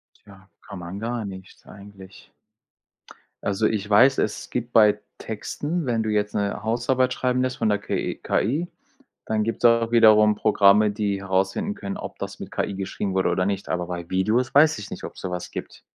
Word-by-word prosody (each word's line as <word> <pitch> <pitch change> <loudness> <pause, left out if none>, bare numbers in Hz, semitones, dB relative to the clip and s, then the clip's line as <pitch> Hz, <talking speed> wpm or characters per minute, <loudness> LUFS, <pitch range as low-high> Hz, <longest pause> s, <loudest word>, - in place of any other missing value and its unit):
Tja, 95 -2 -18
kann 100 - -10
man 85 +3 -7
gar 115 0 -3
nichts 95 -1 -11
eigentlich. 100 -2 -14 1.1
Also 100 +2 0
ich 105 -2 -3
weiß, 130 +6 +5
es 105 - -2
gibt 120 -1 -3
bei 105 -2 +5 0.2
Texten, 145 +9 -4
wenn 120 -3 0
du 110 - -2
jetzt 105 -1 0
'ne 100 0 -2
Hausarbeit 125 +3 +1
schreiben 125 0 0
lässt 130 0 -1
von 115 - 0
der 105 -1 +2
KE 105 - -3
KI, 150 - -1 0.6
dann 110 -1 0
gibt's 115 +2 -2
auch 115 -1 +4
wiederum 110 -2 +6
Programme, 105 0 +4
die 100 -2 -2
herausfinden 95 - -1
können, 100 -1 -6
ob - - -8
das - - -6
mit - - -8
KI 100 - -2
geschrieben 95 0 -4
wurde 95 0 +1
oder 90 - 0
nicht. 100 0 -2
Aber 90 -1 -2
bei 85 -1 -6
Videos 110 +8 0
weiß 150 -3 +5
ich 105 - -9
nicht, - - -7
ob's - - -8
sowas 90 -2 -5
gibt. - - -8
105 Hz, 185 wpm, -24 LUFS, 100-115 Hz, 1.1 s, wiederum